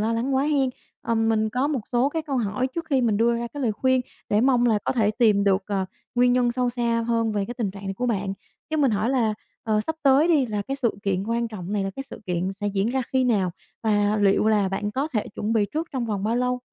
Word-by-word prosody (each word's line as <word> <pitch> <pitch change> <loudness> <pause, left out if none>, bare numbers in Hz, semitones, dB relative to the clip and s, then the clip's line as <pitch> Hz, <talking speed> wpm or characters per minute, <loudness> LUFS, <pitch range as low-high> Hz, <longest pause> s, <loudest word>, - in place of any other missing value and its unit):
lo 220 +2 +1
lắng 250 +4 0
quá 265 - +3
hen. 280 -4 +2 0.3
Ờ, 230 - 0
mình 225 -1 +2
có 255 +5 0
một 285 -5 -1
số 245 +3 +3
cái 320 +1 -3
câu 280 -3 -3
hỏi 225 +2 0
trước 335 -1 -3
khi 270 - +3
mình 225 -4 +2
đưa 235 +2 +3
ra 235 0 -2
cái 285 +1 -6
lời 225 -3 +1
khuyên 260 +4 +2 0.3
để 205 +1 +3
mong 245 -1 +3
là 220 -3 +3
có - - +1
thể 215 -4 +2
tìm 215 -3 +3
được, 195 -1 +3
ờ, 195 -2 -1 0.3
nguyên 245 0 +4
nhân 245 -1 +2
sâu 250 0 0
xa 235 -1 0
hơn 230 -2 +1
về 205 -1 0
cái 240 +5 -6
tình 220 -6 -2
trạng 195 0 -10
này 195 - -3
của 250 +5 -2
bạn. 195 -4 -1 0.4
Cho 315 - 0
mình 275 -5 +3
hỏi 215 +4 0
là, 225 -5 +1 0.3
ờ, 215 -1 +1
sắp 320 +9 -3
tới 280 +4 +5
đi, 290 -6 +3
là 210 -2 -2
cái 270 +6 -4
sự 235 - +2
kiện 195 -1 0
quan 235 0 0
trọng 195 -3 -6
này 200 -2 0
là 195 - -2
cái 270 - -3
sự - - -9
kiện 180 +1 -1
sẽ 205 - -1
diễn 200 +1 0
ra 265 0 0
khi 260 -1 +3
nào 200 -7 +2 0.3
và 210 -1 +2
liệu 205 +1 +3
là 205 -3 +3
bạn 205 +2 -2
có 270 +7 -1
thể 220 -9 -2
chuẩn 215 +2 -2
bị 220 -2 +3
trước 320 +2 -2
trong 255 -3 -1
vòng 205 -2 -2
bao 225 +2 +1
lâu? 250 0 0
230 Hz, 275 wpm, -24 LUFS, 205-255 Hz, 0.4 s, tới